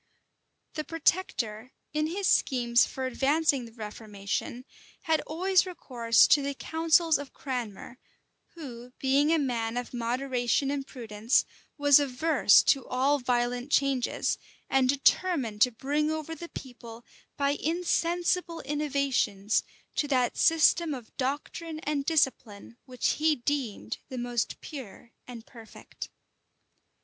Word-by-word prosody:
The 305 - -3
protector, 255 - -1 0.2
in 305 0 0
his 385 +5 -3
schemes 240 -7 +3
for 265 - -5
advancing 275 +1 +1
the 230 - -12
reformation, 215 +2 -5 0.4
had 320 -1 +1
always 370 +4 +2
recourse 240 -10 +2
to 290 - +5
the 280 0 -3
counsels 325 +1 +2
of 285 -1 -9
Cranmer, 245 -2 -6 0.6
who, 250 -6 -9
being 275 +3 +3
a 330 - +4
man 240 -5 -1
of 245 0 -5
moderation 250 +2 0
and 280 -1 -3
prudence, 225 -1 0 0.3
was 285 -1 +6
averse 280 -3 +4
to 275 - +3
all 270 +3 +1
violent 245 +1 -1
changes, 275 -4 +1 0.3
and 265 -1 +3
determined 275 - +1
to 250 - +6
bring 290 +6 -1
over 315 0 -3
the 340 +1 -8
people, 240 -3 -10 0.3
by 280 -1 +2
insensible 340 +2 0
innovations, 275 -8 0 0.4
to 295 - +1
that 255 -4 +1
system 325 -1 +3
of 245 -4 -12
doctrine 295 +4 -4
and 290 -2 -2
discipline 240 -9 0
which 255 -2 -2
he 310 0 +3
deemed 240 - -3
the 260 - -6
most 240 -1 -2
pure 240 -5 -10 0.2
and 240 -2 -9
perfect. 225 -3 -11
270 Hz, 125 wpm, -28 LUFS, 240-305 Hz, 0.6 s, was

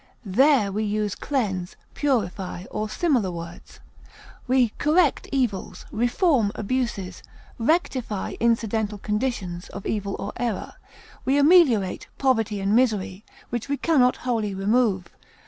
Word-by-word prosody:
There 230 +1 +4
we 210 +3 -1
use 210 -1 -1
cleanse, 195 -10 -2 0.2
purify, 195 -10 -1
or 215 0 -3
similar 255 - +1
words. 170 -1 -9 0.7
We 255 -2 +3
correct 310 0 +2
evils, 245 -9 -2
reform 240 - +2
abuses, 205 -5 -2 0.4
rectify 250 - 0
incidental 220 -2 0
conditions 210 -5 -3
of 200 - -8
evil 200 -2 -2
or 200 - -5
error; 235 -5 -3 0.5
we 270 +2 +2
ameliorate 285 - +4
poverty 225 -6 +1
and 195 +2 +1
misery, 210 -5 +1 0.3
which 240 +3 -3
we 285 - 0
can 320 -1 +2
not 250 0 +4
wholly 220 -5 -1
remove. 200 -1 +1
220 Hz, 120 wpm, -24 LUFS, 200-260 Hz, 0.7 s, There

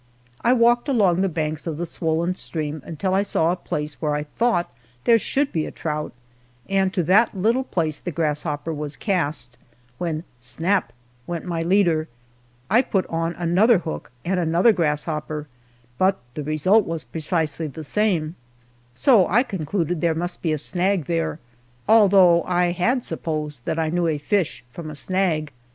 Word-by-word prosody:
I 235 - +4
walked 240 +2 +3
along 195 -9 +3
the 195 - +2
banks 155 -1 -3
of 160 -3 -3
the 175 - -2
swollen 165 +1 -1
stream 155 -4 -4
until 185 +4 -2
I 195 - +3
saw 170 -5 +1
a - - 0
place 150 -4 -5
where 150 -2 0
I 150 - -2
thought 175 - 0 0.3
there 230 - +5
should 275 +5 0
be 160 -2 -1
a - - -7
trout, 150 -1 -4 0.6
and 195 -1 +1
to 180 - +2
that 200 +5 +3
little 230 +7 +2
place 160 - -1
the - - -5
grasshopper 150 -1 -2
was 150 -1 -5
cast, 150 - -2 0.4
when 165 -2 -2 0.2
snap! 165 +11 0 0.4
went 170 -2 -4
my 170 -2 -2
leader. 170 -3 +2 0.6
I 220 +6 +5
put 195 -7 0
on 165 +1 -1
another 185 +7 +3
hook 75 - -6
and 185 +1 0
another 170 +6 +4
grasshopper, 150 -2 -2 0.5
but 190 +1 +3 0.2
the 150 - -4
result 155 +9 +3
was 165 -1 -3
precisely 160 -1 -2
the 155 +2 -8
same, 170 -3 0 0.6
so 215 - +5
I 235 +7 +3
concluded 175 - -2
there 165 -2 +2
must 175 +2 -3
be 165 - 0
a 155 - +1
snag 180 +2 0
there, 165 -1 -1 0.5
although 195 -6 +6
I 180 -1 +2
had 235 +9 +1
supposed 150 -5 -4
that 160 - -1
I 160 -1 0
knew 175 0 +1
a 155 -2 0
fish 170 0 -1
from 165 -3 -7
a 150 - -7
snag! 160 -4 0
170 Hz, 170 wpm, -23 LUFS, 155-190 Hz, 0.6 s, although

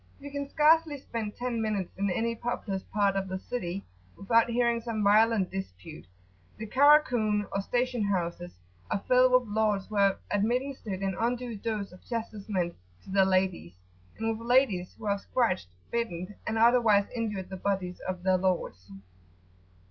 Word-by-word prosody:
You 285 0 -9
can 280 0 -4
scarcely 310 0 +4
spend 225 -5 -5
ten 245 -2 -2
minutes 210 -4 -2
in 200 +1 -1
any 230 +5 0
populous 225 -4 -3
part 200 -1 0
of 195 0 -1
the 190 0 -3
city 190 -3 -5 0.3
without 230 +3 +3
hearing 235 0 +1
some 225 -2 -3
violent 210 -1 +4
dispute. 95 - -8 0.5
The 220 - -6
"Karakun," 245 -5 +4
or 195 - -1
station 245 +1 -1
houses, 175 - -2 0.3
are 200 - -2
filled 255 0 +5
with 250 -1 +4
lords 210 -3 +1
who 215 - -6
have 200 -1 +4
administered 225 -1 -1
an 190 -1 -1
undue 240 0 -1
dose 210 -1 -4
of 180 - -15
chastisement 210 -6 -3 0.3
to - - -11
their 195 0 +4
ladies, 185 - 0 0.4
and 225 - -2
with 230 - -9
ladies 235 -8 +2
who 225 - -10
have 200 -1 0
scratched, 205 - 0 0.2
bitten, 195 -5 -3
and 220 - -1
otherwise 225 -3 +5
injured 210 -5 -3
the 190 - -5
bodies 185 -2 -2
of 185 -1 -4
their 185 0 +3
lords. 170 - -2
210 Hz, 160 wpm, -28 LUFS, 190-235 Hz, 0.5 s, filled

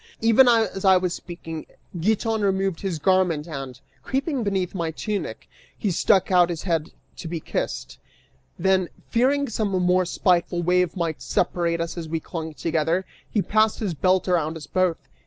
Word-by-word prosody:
Even 230 +3 +5
as 225 -5 +2
I 190 -1 +6
was 180 -1 -1
speaking, 165 -3 -7 0.3
Giton 220 +4 +1
removed 195 -3 0
his 190 -5 -2
garment 175 -2 +2
and, 135 -5 -6 0.2
creeping 275 -1 -1
beneath 190 -3 -1
my 170 -4 -2
tunic, 205 +5 -4 0.3
he 205 - -1
stuck 190 +3 +3
out 180 -1 +5
his 170 -2 -4
head 165 -4 -1 0.3
to 170 - -7
be 165 0 -3
kissed; - - -4 0.6
then, 185 0 +2 0.2
fearing 275 +4 +2
some 215 -2 -1
more 185 -1 +2
spiteful 175 -1 +1
wave 180 +1 +2
might 165 -3 -2
separate 170 -1 0
us 170 +1 -3
as 160 -2 -6
we 165 0 -1
clung 160 -1 -6
together, 165 +3 0 0.2
he 210 - 0
passed 215 0 +2
his 200 -6 -2
belt 185 +4 +2
around 165 -3 +1
us 155 - -9
both. 185 -3 +1
180 Hz, 165 wpm, -24 LUFS, 165-200 Hz, 0.6 s, I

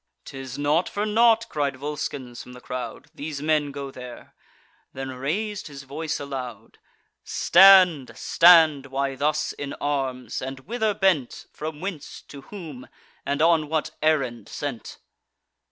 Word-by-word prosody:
"'Tis 135 -1 -8
not 150 +4 +1
for 205 +1 -2
naught," 230 +1 +4
cried 145 -3 -2
Volscens 135 -3 -5
from 125 - -12
the 125 - -11
crowd, 125 0 -6
"These 145 -1 -6
men 150 -1 +1
go 140 -1 -6
there;" 125 -2 -11 0.6
then 135 0 -5
rais'd 185 +11 -3
his 140 -2 -10
voice 155 +3 -4
aloud: 135 -4 -7 0.4
"Stand! 180 -7 +6
stand! 160 -5 +5
why 135 0 -2
thus 150 +3 0
in 140 -1 -6
arms? 135 -3 -3
And 135 +1 -6
whither 220 - -1
bent? 180 -11 0
From 155 0 -6
whence, 185 -6 -6
to 140 - -10
whom, 160 -11 -9 0.4
and 140 +2 +1
on 160 -3 +3
what 160 -1 -1
errand 130 -8 0
sent?" 140 -6 -6
145 Hz, 135 wpm, -24 LUFS, 135-165 Hz, 0.6 s, Stand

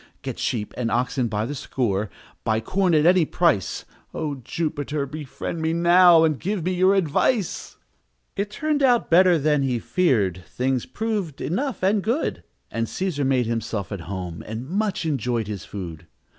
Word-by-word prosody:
"Get - - -5
sheep 110 -4 -2
and 120 -2 -1
oxen 125 +2 0
by 105 0 -1
the 140 - -4
score! 110 -7 -1 0.3
Buy 110 0 +1
corn 180 - +1
at 155 0 +4
any 180 0 +6
price! 160 - 0 0.3
O 155 -2 -2
Jupiter! 145 -1 -2
befriend 150 +3 -6
me 160 0 0
now, 170 0 +6
And 155 -4 +1
give 190 -2 -2
me 185 - +1
your 185 +2 +4
advice!" 195 - 0 0.6
It 200 +1 -2
turned 300 +6 -1
out 245 -7 +3
better 180 0 +6
than 150 -1 +2
he 130 -3 0
feared, 110 - +1
Things 130 -1 -1
proved 205 -9 -3
enough 245 - -2
and 200 +2 +3
good, 235 +10 -1 0.3
And 115 0 -1
Cæsar 155 -6 -2
made 130 -2 +2
himself 110 -3 -3
at 100 -4 -4
home, 90 -4 -5
And 110 +4 -5
much 195 0 -1
enjoyed 125 -6 -1
his 100 -2 -6
food. 85 -5 -7
150 Hz, 165 wpm, -23 LUFS, 115-185 Hz, 0.6 s, any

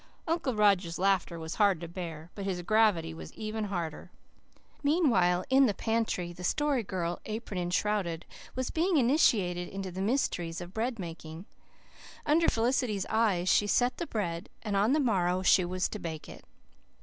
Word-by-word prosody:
Uncle 320 -7 0
Roger's 195 -5 +3
laughter 185 -2 +1
was 160 0 -5
hard 200 -5 +4
to 170 - -6
bear, 165 -2 -7
but 200 - -6
his 185 -2 -3
gravity 195 -5 +2
was 160 - -9
harder. 200 -7 -4 0.7
Meanwhile, 235 - +3
in 265 0 +6
the 205 - -1
pantry 220 -6 -1
the 180 - -10
Story 290 +6 +1
Girl, 175 -4 -3
apron 215 -3 -4
enshrouded, 175 -1 -1 0.3
was 255 0 -2
being 340 +1 +2
initiated 215 - +3
into 195 -1 -5
the 185 +2 -5
mysteries 190 -7 -1
of 175 +1 -8
bread 230 +2 -1
making. 165 -1 -8 0.8
Under 325 +3 +3
Felicity's 230 -4 0
eyes 210 -6 +2
she 205 - +4
set 245 +4 +2
the 340 - -4
bread, 175 -3 -3
and 210 -3 -2
on 210 +6 +3
the 310 - +3
morrow 185 -8 +1
she 185 0 +5
was 180 +1 -1
to 210 - -6
bake 160 -4 -6
it. - - -11
195 Hz, 160 wpm, -30 LUFS, 175-230 Hz, 0.8 s, in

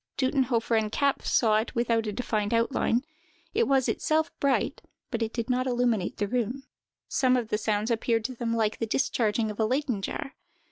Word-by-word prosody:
Duttenhofer 260 -4 +1
and 215 -1 -2
Kapff 280 +2 0
saw 215 -3 +4
it 220 +2 -2
without 230 -2 +1
a - - -1
defined 215 -1 -1
outline; 235 +1 +1 0.5
it 465 +2 +2
was 270 -2 +3
itself 315 +1 +1
bright, 280 -2 +1 0.3
but 225 -2 -1
did 230 -2 -3
not 255 0 0
illuminate 240 -6 0
the 205 - -1
room. 250 +4 -2 0.4
Some 255 -2 +2
of 235 -3 -2
the 210 - +1
sounds 215 +1 0
appeared 225 -1 +1
to 255 - -2
them 235 -1 -3
like 220 -1 0
the 225 - -1
discharging 220 -2 +1
of 210 - -10
a 220 - +3
Leyden 255 -3 0
jar. 270 - -4
235 Hz, 185 wpm, -27 LUFS, 220-255 Hz, 0.5 s, saw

